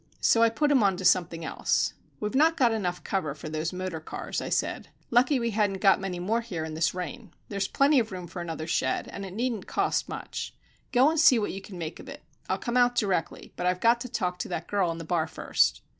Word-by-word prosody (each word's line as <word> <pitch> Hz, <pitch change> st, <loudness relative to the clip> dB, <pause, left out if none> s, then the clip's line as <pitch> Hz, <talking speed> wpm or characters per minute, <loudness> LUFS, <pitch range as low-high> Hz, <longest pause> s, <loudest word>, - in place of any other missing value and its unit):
So 230 Hz, -, +4 dB
I 230 Hz, -, +6 dB
put 290 Hz, +6 st, +1 dB
him 270 Hz, -4 st, +5 dB
on 195 Hz, -3 st, +3 dB
to 190 Hz, -, -5 dB
something 170 Hz, -2 st, +2 dB
else. -, -, 0 dB, 0.3 s
"We've 210 Hz, +2 st, -3 dB
not 315 Hz, +5 st, +4 dB
got 245 Hz, -3 st, +4 dB
enough 185 Hz, -5 st, -2 dB
cover 155 Hz, -8 st, -2 dB
for 155 Hz, -, -8 dB
those 155 Hz, +1 st, -2 dB
motor 185 Hz, -3 st, -4 dB
cars," 160 Hz, -, -5 dB
I -, -, -4 dB
said. -, -, -1 dB, 0.2 s
"Lucky 255 Hz, +3 st, +4 dB
we 235 Hz, -1 st, -1 dB
hadn't 205 Hz, -2 st, +1 dB
got 195 Hz, 0 st, +5 dB
many 190 Hz, -2 st, -3 dB, 0.2 s
here 175 Hz, -9 st, -4 dB
in 160 Hz, -, -6 dB
this 165 Hz, +3 st, 0 dB
rain. 180 Hz, +2 st, -6 dB
There's 200 Hz, -1 st, -1 dB
plenty 280 Hz, 0 st, +4 dB
of 225 Hz, -2 st, -2 dB
room 180 Hz, -1 st, -6 dB
for 175 Hz, +1 st, -7 dB
another 165 Hz, -2 st, -5 dB
shed, 130 Hz, -5 st, 0 dB
and 200 Hz, -, -7 dB
it 185 Hz, -, -9 dB
needn't 230 Hz, -3 st, -2 dB
cost -, -, 0 dB
much. -, -, -6 dB, 0.4 s
Go 260 Hz, +4 st, +5 dB
and 325 Hz, -, 0 dB
see 275 Hz, -5 st, +7 dB
what 210 Hz, -, -1 dB
you 195 Hz, -, -6 dB
can 195 Hz, -1 st, -10 dB
make 165 Hz, -1 st, -5 dB
of -, -, -10 dB
it. -, -, -10 dB, 0.3 s
I'll 190 Hz, -, +1 dB
come 240 Hz, +4 st, -2 dB
out 245 Hz, 0 st, +4 dB
directly, 195 Hz, -7 st, -1 dB
but 180 Hz, -, -2 dB
I've 180 Hz, 0 st, +1 dB
got 235 Hz, +2 st, +4 dB
to 250 Hz, -, -5 dB
talk 180 Hz, -6 st, -2 dB
to -, -, -3 dB
that 170 Hz, -2 st, -4 dB
girl 195 Hz, -3 st, +1 dB
in 165 Hz, -, -3 dB
the 165 Hz, -, -6 dB
bar 165 Hz, 0 st, 0 dB
first." 160 Hz, -, +1 dB
195 Hz, 245 wpm, -27 LUFS, 175-235 Hz, 0.4 s, see